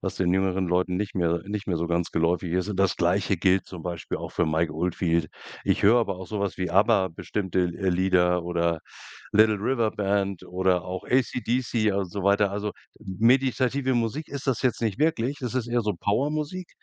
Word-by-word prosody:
was - - -3
den 90 -2 +1
jüngeren 95 -1 +1
Leuten 90 +1 +1
nicht 105 +1 -3
mehr 85 -1 +1
nicht 105 0 -4
mehr 90 - 0
so 85 - -1
ganz 85 0 0
geläufig 85 +1 0
ist, 90 +2 0
und 105 - -3
das 95 -1 +3
Gleiche 90 +3 +1
gilt 95 +2 +2
zum 90 -3 -9
Beispiel 85 -1 -4
auch - - -6
für 85 - 0
Mike 80 0 0
Oldfield. 85 0 0 0.4
Ich - - +1
höre 110 +4 +6
aber 100 -5 -1
auch 95 0 -8
so 105 - -4
was 100 -1 -2
wie 90 -2 -2
Abba, 100 0 +3
bestimmte 95 +2 -2
L 90 -1 0
äh, 95 +1 -2
Lieder 90 -1 +2
oder 85 -1 0 0.5
Little 110 0 +5
River 115 +1 0
Band 100 -2 -1
oder 90 -1 0
auch 90 0 -5
ACDC 120 -3 0
und 100 -2 -1
so 100 - -4
weiter. 100 +1 +3
Also, 105 +1 -2 0.3
m 95 -3 -7
meditative 130 +2 +2
Musik 120 +6 -1
ist 140 -1 -6
das 130 -5 0
jetzt 125 - +1
nicht 110 0 -1
wirklich, 145 -3 +1
das 125 -2 -4
ist 125 -3 -1
eher 120 0 +1
so 105 -3 -1
Power-Musik, 150 - -1
95 Hz, 205 wpm, -26 LUFS, 90-115 Hz, 0.5 s, höre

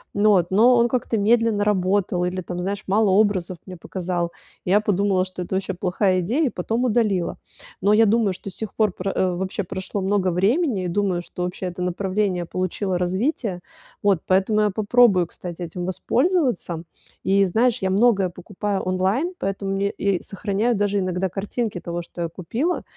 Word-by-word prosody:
но 205 0 +5
от, 175 -1 0
но 230 +6 +6
он 235 0 +4
как-то 240 -2 -1
медленно 220 0 +3
работал 190 -2 +1
или, 185 +1 -2
там 180 0 -6
знаешь, 195 +2 -3
мало 205 +1 +3
образов 190 -3 +2
мне 185 -1 -8
показал. 175 0 -3 0.3
Я 195 +3 +4
подумала, 200 -2 +1
что 185 -1 -7
это 185 - -4
вообще 190 0 -2
плохая 185 +1 +1
идея, 240 - +1
и - - +1
потом 225 +7 -2
удалила. 215 -7 +1 0.4
Но 200 +2 +4
я 225 +1 +6
думаю, 215 -2 +2
что 195 - -8
с - - -15
тех 220 -3 -6
пор 215 -2 +2
про 185 +2 -3
э, 185 -1 +1
вообще 190 +2 -3
прошло 190 +2 -4
много 190 -1 +1
времени, 205 - +1
и - - -1
думаю, 185 -1 0
что 180 - -6
вообще 180 +1 -3
это 180 0 -6
направление 185 0 -1
получило 185 +1 -2
развитие. 185 - -1 0.4
Вот, 195 -5 +3
поэтому 195 +3 +2
я 210 - +3
попробую, 210 -3 +4
кстати, 175 +1 -8
этим 175 +1 -5
воспользоваться. 245 - 0 0.4
И, 195 0 +3
знаешь, 230 +6 +2
я 190 - 0
многое 200 -2 +3
покупаю 195 +3 -4
онлайн, 190 - 0
поэтому 195 0 -2
мне 200 +1 -1
я 200 -1 +2
и - - -10
сохраняю 205 +4 -1
даже 205 0 +1
иногда 185 0 -1
картинки 205 +2 -3
того, 175 0 -4
что 170 0 -9
я - - -1
купила. 225 - -2
195 Hz, 185 wpm, -23 LUFS, 180-215 Hz, 0.4 s, но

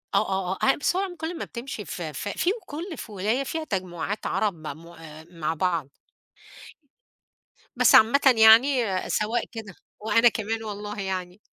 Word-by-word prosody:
آه، - - +6
آه، 190 -1 -1
آه. 190 - -2
آآ - - +5
بس 290 - 0
هو 375 - +1
عم 380 -2 -4
كل 330 +1 -5
ما - - -4
بتمشي 235 -3 -7
ف 180 - -7
ف 155 +3 -5
فيه 350 - 0
كل 325 +3 -7
في 220 - -8
ولاية 210 +7 -1
فيها 320 +4 -4
تجمعات 185 - -4
عرب 210 -2 0
معمو 160 +1 -10
آآ 160 -1 -12
مع 165 -2 -2
بعض. 165 -4 -1 1.9
بس - - +5
عامةً 230 +6 +6 0.2
يعني 230 +4 +6 0.2
سواء 225 +3 0
كده 220 -5 -8 0.3
وأنا 225 +3 +4
كمان 225 0 -3
والله 210 -1 -6
يعني. 185 -1 -4
210 Hz, 165 wpm, -25 LUFS, 180-240 Hz, 1.9 s, آه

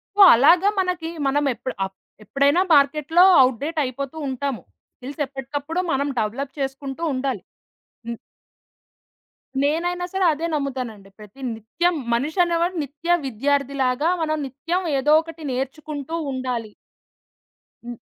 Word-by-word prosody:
So, 410 - +4
అలాగా 340 - +5
మనకి 360 -3 -1 0.2
మనం 290 +2 +1
ఎప్పుడ్ 250 +3 -6
అప్ 190 0 -10 0.3
ఎప్పుడైనా 280 - +2
మార్కెట్‌లో 300 +5 +4 0.2
అవుట్‌డేట్ 280 +6 +1
అయిపోతూ 275 +4 -5
ఉంటాము. 265 -1 -3 0.4
స్కిల్స్ 275 +3 -7
ఎప్పటికప్పుడు 285 +5 -4
మనం 280 +2 0
డెవలప్ 245 +6 -2
చేసుకుంటూ 270 +2 -4
ఉండాలి. 255 -5 -2 0.7
హ్మ్. 235 -1 -5 1.5
నేనైనా 350 +4 0
సరే, 380 -1 +1
అదే 325 +3 -4
నమ్ముతానండి. 255 -9 -4
ప్రతి 210 +6 -14
నిత్యం 330 - -1 0.2
మనిషనేవాడు 335 +7 +1
నిత్య 320 +5 0
విద్యార్థి 275 +3 0
లాగా, 255 +6 +1
మనం 310 -1 0
నిత్యం 330 +8 -3 0.2
ఏదో 295 +3 +3
ఒకటి 325 -1 -10
నేర్చుకుంటూ 285 +3 -4 0.2
ఉండాలి. 245 -4 -3 1.1
హ్మ్. 240 -1 -7
280 Hz, 115 wpm, -22 LUFS, 255-325 Hz, 1.5 s, అలాగా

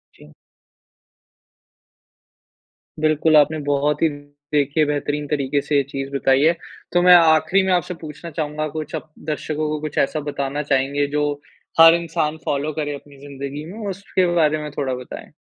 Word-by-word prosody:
जी। 75 - -17 2.7
बिल्कुल 155 0 +3
आपने 150 +2 +4
बहुत 145 +1 +1
ही 165 - +5 0.5
देखिए 145 +1 +2
बेहतरीन 145 0 -2
तरीके 140 -1 0
से 150 - -2
ये 140 - +4
चीज़ 135 -1 -4
बताई 135 0 +3
है। 165 +2 +5 0.4
तो 175 - +4
मैं 180 0 +7
आखिरी 160 +3 +4
में 190 - 0
आपसे 180 0 0
पूछना 155 +2 -8
चाहूँगा 155 0 -3
कुछ 155 0 -5
आप 155 - -7 0.2
दर्शकों 155 0 -2
को 155 0 -2
कुछ 155 -1 -6
ऐसा 145 +3 +1
बताना 140 +1 -3
चाहेंगे 140 0 +1
जो 150 - +2 0.6
हर 165 0 +10
इंसान 160 -2 -2
फॉलो 145 +2 -1
करे 145 -1 -3
अपनी 140 0 -14
ज़िंदगी 140 +2 -6
में 215 -2 -6
उसके 190 -1 -1
बारे 155 -2 +3
में 150 - -5
थोड़ा 135 -3 -1
बताएँ? 125 0 -9
150 Hz, 160 wpm, -21 LUFS, 140-160 Hz, 2.7 s, हर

